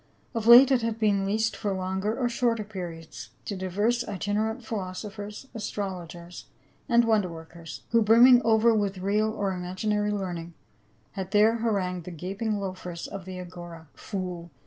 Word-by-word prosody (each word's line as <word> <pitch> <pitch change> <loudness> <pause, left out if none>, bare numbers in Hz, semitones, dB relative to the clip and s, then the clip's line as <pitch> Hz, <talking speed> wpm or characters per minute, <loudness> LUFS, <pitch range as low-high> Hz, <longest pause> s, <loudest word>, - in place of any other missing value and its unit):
Of 225 -2 -2
late 250 +3 +9
it 255 -2 +4
had 225 -1 -2
been 200 -3 +1
leased 220 +3 0
for 205 -3 -2
longer 190 +4 -2
or 250 - +1
shorter 235 -2 0
periods 170 - -8 0.2
to 200 - -3
divers 205 +6 0
itinerant 215 +3 -2
philosophers, 205 +3 -6
astrologers 180 -5 -6 0.4
and 235 -1 +5
wonder 215 -5 +2
workers, 165 -1 -10
who 230 -1 +4
brimming 240 +3 +7
over 225 +1 +4
with 200 -3 0
real 205 +3 +1
or 205 -3 -2
imaginar)^ 205 +3 -1
learning 175 -4 -4 0.6
had 190 -2 -5
there 215 +2 +4
harangued 190 -6 -1
the - - -6
gaping 195 +6 -3
loafers 185 -3 -5
of 195 -3 -7
the 185 -1 -7
Agora. 175 -3 -10
" - - -38 0.2
Fool 180 -4 -4
200 Hz, 155 wpm, -27 LUFS, 180-220 Hz, 0.6 s, late